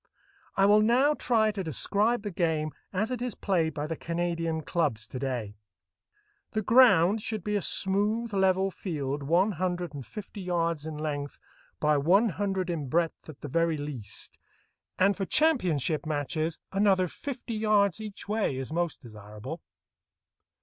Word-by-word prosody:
I 195 - +5
will 210 +1 +6
now 250 +7 +4
try 225 -6 +2
to 200 -2 -4
describe 205 - +1
the 205 - -3
game 160 -3 0 0.2
as 210 +5 -1
it 250 -2 -3
is 245 -4 -2
played 165 -5 0
by 150 0 -2
the 165 +1 -3
Canadian 165 -1 -2
clubs 140 -10 -1
to 130 - -6
day. 120 -6 -3 1.0
The 215 -1 0
ground 220 -4 +5
should 215 -3 -3
be 210 +1 -1
a 205 - +1
smooth, 205 +7 0
level 190 0 +2
field 145 -7 -3
one 175 +9 +2
hundred 180 -1 -2
and 140 -2 -6
fifty 210 - -8
yards 170 -4 -1
in 155 -1 -5
length 145 -2 -4 0.4
by 150 -1 +3
one 190 +11 +4
hundred 190 -1 -1
in 155 -5 -3
breadth 165 +1 -1
at 145 - -11
the - - -5
very 165 +2 +1
least, 130 -9 -6 0.6
and 195 +2 +4
for 200 - -3
championship 175 - +1
matches 155 +2 -1
another 195 -2 +3
fifty 250 - -6
yards 215 -2 +2
each 210 -2 -7
way 210 -10 0
is 135 +3 -5
most 170 -4 -2
desirable. 110 +7 -9
175 Hz, 155 wpm, -28 LUFS, 150-205 Hz, 1.0 s, will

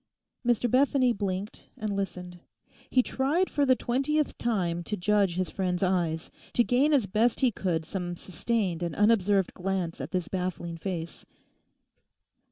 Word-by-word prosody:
Mr 240 -1 +2
Bethany 255 0 +3
blinked 195 0 -4
and 215 -4 -2
listened. 180 -2 -4 0.5
He 255 - +4
tried 295 +11 0
for 285 -1 +1
the 260 - +6
twentieth 275 +5 0
time 180 -8 0
to 210 - -2
judge 200 -1 +2
his 185 0 -1
friend's 180 -1 -1
eyes, 175 -3 0 0.2
to 240 - +4
gain 260 +6 +3
as 275 -7 +4
best 220 +7 +1
he 255 -2 +4
could 170 -6 -1
some 175 -2 -4
sustained 185 -1 -2
and 170 -2 -2
unobserved 205 -3 +3
glance 180 -4 -2
at 135 - -5
this 180 -1 -2
baffling 180 -2 -3
face. 170 -1 -5
195 Hz, 150 wpm, -28 LUFS, 180-240 Hz, 0.5 s, the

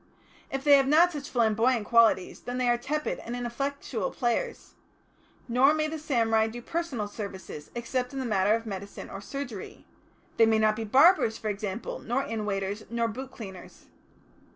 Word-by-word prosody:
If 270 0 -3
they 285 -1 +7
have 270 -1 +2
not 330 +5 +5
such 295 -3 -6
flamboyant 230 0 +2
qualities 230 -6 +3
then 245 0 -5
they 250 -1 +1
are 240 - +4
tepid 300 +5 -2
and 235 - -6
ineffectual 245 -3 -3
players. 460 - -2 0.7
Nor 260 +5 +4
may 310 0 0
the 315 0 -5
samurai 225 -6 +2
do 230 +2 -7
personal 270 -6 -3
services, 195 -7 -8
except 250 +1 -2
in 275 - -7
the 265 - -2
matter 210 -1 +3
of 230 0 -4
medicine 200 -1 -7
or 195 - -7
surgery; 245 -3 -7 0.5
they 225 - +6
may 220 0 +4
not 215 0 +3
be 225 0 -4
barbers, 265 - +5
for 215 - -3
example, 205 +1 -4
nor 250 +4 -1
inn 220 -4 -4
waiters, 200 +1 -2
nor 235 0 0
boot 255 +4 -6
cleaners. 190 -8 -11
235 Hz, 175 wpm, -28 LUFS, 215-270 Hz, 0.7 s, they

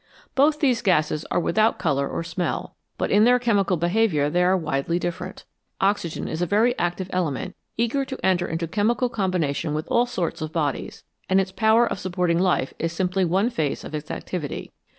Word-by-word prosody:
Both 295 +3 +3
these 255 -6 +3
gases 155 -5 +1
are - - +1
without 215 +5 +2
colour 140 -6 0
or - - -3
smell, 175 +1 -3 0.2
but - - -1
in 210 - +5
their 245 +2 +6
chemical 205 -6 +1
behaviour 170 -4 +2
they 175 +2 +2
are 185 +1 +4
widely 155 0 -1
different. 175 -1 -5 0.3
Oxygen 195 -4 0
is 160 - -4
a 175 - +1
very 225 +6 +3
active 175 +2 -1
element, 165 -7 -2 0.2
eager 235 +4 +1
to 265 0 -6
enter 180 -2 +2
into 165 +1 -2
chemical 230 +7 +1
combination 170 - -1
with 155 - -3
all 240 +1 +3
sorts 205 -10 -3
of 155 0 -3
bodies, 150 -4 -2 0.3
and 190 +1 +4
its 190 0 -1
power 220 +3 +4
of - - -3
supporting 180 -2 0
life 180 -8 +1
is 165 +1 -1
simply 185 +2 0
one 195 +8 +1
phase 155 - -2
of - - -9
its 150 -1 -5
activity. 160 -6 -5
180 Hz, 190 wpm, -24 LUFS, 165-220 Hz, 0.3 s, their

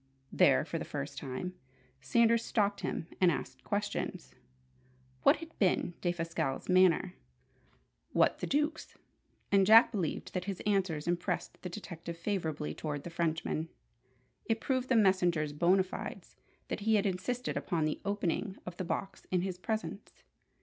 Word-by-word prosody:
There, - - +4
for - - -3
the - - -3
first - - -5
time, 135 +8 -4 0.5
Sanders 230 - +3
stopped 205 -3 0
him - - -2 0.2
and 180 - +7
asked - - -5
questions: - - -3 0.9
what 280 - +6
had 330 0 -10
been 180 -2 +2
Defasquelle's 165 -5 -2
manner, 185 0 +4 1.0
what - - +3
the - - -3
Duke's? 300 +3 -1 0.5
And 195 -1 +6
Jack 220 +4 +8
believed 185 -8 -3
that 180 -1 -2
his 195 -2 -4
answers 190 -7 0
impressed 175 0 -2
the 180 - -5
detective 170 -3 -7
favourably 165 -5 -2
toward 145 -2 -4
the 175 - -7
Frenchman. 160 -1 -1 0.8
It 225 -1 0
proved 255 0 -1
the 260 - +4
messenger's 180 -7 +3
bona 175 +5 +4
fides 185 - -7 0.3
that - - -2
he 220 +1 +2
had 205 0 +2
insisted 220 +6 -2
upon 165 -5 0
the 155 - -2
opening 200 0 -1
of 180 -1 -7
the - - -2
box 190 +2 -4
in 180 -1 +1
his 185 -1 -3
presence. 220 0 -4
185 Hz, 150 wpm, -32 LUFS, 170-210 Hz, 1.0 s, Jack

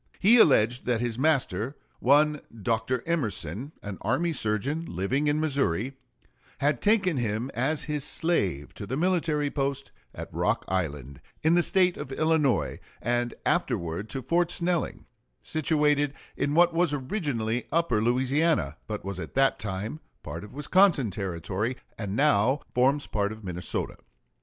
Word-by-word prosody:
He 220 +6 +6
alleged 125 - +4
that 120 -2 +2
his 120 0 -2
master, 135 - +1 0.2
one 150 +3 +4 0.2
Dr. 115 +3 0
Emerson, 120 - -1
an 100 -2 -6
army 145 +10 0
surgeon, 135 +8 -1
living 120 - -1
in 145 +1 +2
Missouri, 135 - 0 0.6
had 145 +1 +1
taken 200 -7 +2
him 115 +2 -2
as 135 +6 0
his 150 -2 -2
slave 100 - -1
to 100 - -8
the 130 - -2
military 160 -4 +1
post 140 -1 -2 0.2
at - - -8
Rock - - 0
Island, 75 -8 -3 0.2
in 160 +2 +4
the 175 - +5
State 180 0 +3
of 130 - -7
Illinois, 155 -3 +1 0.2
and 120 +1 -1
afterwards 85 +6 -1
to 135 -2 -4
Fort 170 +5 +1
Snelling, 175 -1 -1 0.3
situated 150 -2 +1 0.2
in 145 +1 -1
what 175 0 +5
was 165 -3 +2
originally 130 - -2
Upper 165 -10 +1
Louisiana, 130 - +1
but 105 -2 -5
was 100 -1 -4
at - - -7
that 135 0 +3
time 105 +7 -4 0.2
part 80 +5 -6
of 105 - -11
Wisconsin 150 - +3
Territory, 95 +5 -3 0.2
and 100 -2 -4
now 135 -1 +3
forms 135 +3 +2
part 100 -1 -1
of 110 0 -9
Minnesota. 90 -1 -3
135 Hz, 145 wpm, -27 LUFS, 105-155 Hz, 0.6 s, He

